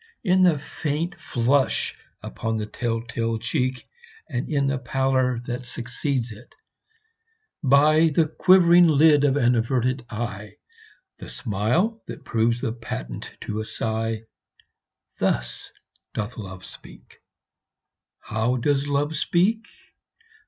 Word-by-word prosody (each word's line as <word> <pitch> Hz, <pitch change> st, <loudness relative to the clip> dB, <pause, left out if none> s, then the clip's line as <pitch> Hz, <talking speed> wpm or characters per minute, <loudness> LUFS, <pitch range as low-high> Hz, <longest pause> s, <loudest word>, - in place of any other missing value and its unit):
In 185 Hz, -2 st, +3 dB
the 175 Hz, -4 st, +5 dB
faint 150 Hz, +3 st, -3 dB
flush 130 Hz, +3 st, +1 dB, 0.3 s
upon 115 Hz, 0 st, -3 dB
the 110 Hz, -1 st, -2 dB
tell 115 Hz, +1 st, -3 dB
tale 115 Hz, -1 st, -2 dB
cheek, 130 Hz, +2 st, -2 dB, 0.4 s
And 125 Hz, -1 st, -3 dB
in 140 Hz, -2 st, +1 dB
the 135 Hz, -1 st, 0 dB
pallor 130 Hz, -1 st, 0 dB
that 125 Hz, 0 st, -5 dB
succeeds 125 Hz, +1 st, -2 dB
it; 110 Hz, +3 st, -14 dB, 1.1 s
by 155 Hz, +3 st, +5 dB
The 160 Hz, +2 st, +2 dB
quivering 175 Hz, +1 st, +5 dB
lid 150 Hz, -1 st, +5 dB
of 140 Hz, -1 st, +3 dB
an 120 Hz, -2 st, +3 dB
averted 125 Hz, +2 st, 0 dB
eye 105 Hz, -2 st, -5 dB, 0.6 s
The -, -, -9 dB
smile 130 Hz, -, -1 dB
that -, -, -9 dB
proves 115 Hz, +1 st, +1 dB
the 115 Hz, -5 st, -1 dB
patent 65 Hz, -, -6 dB
to 105 Hz, 0 st, -4 dB
a -, -, -2 dB
sigh 110 Hz, 0 st, -3 dB, 1.0 s
Thus -, -, -1 dB, 0.5 s
doth 110 Hz, +3 st, -3 dB
Love 95 Hz, -4 st, -8 dB
speak. -, -, -15 dB, 1.0 s
How 110 Hz, +4 st, -1 dB
does 140 Hz, +2 st, +1 dB
Love 145 Hz, +2 st, 0 dB
speak? 200 Hz, +10 st, +1 dB
125 Hz, 120 wpm, -24 LUFS, 115-145 Hz, 1.1 s, the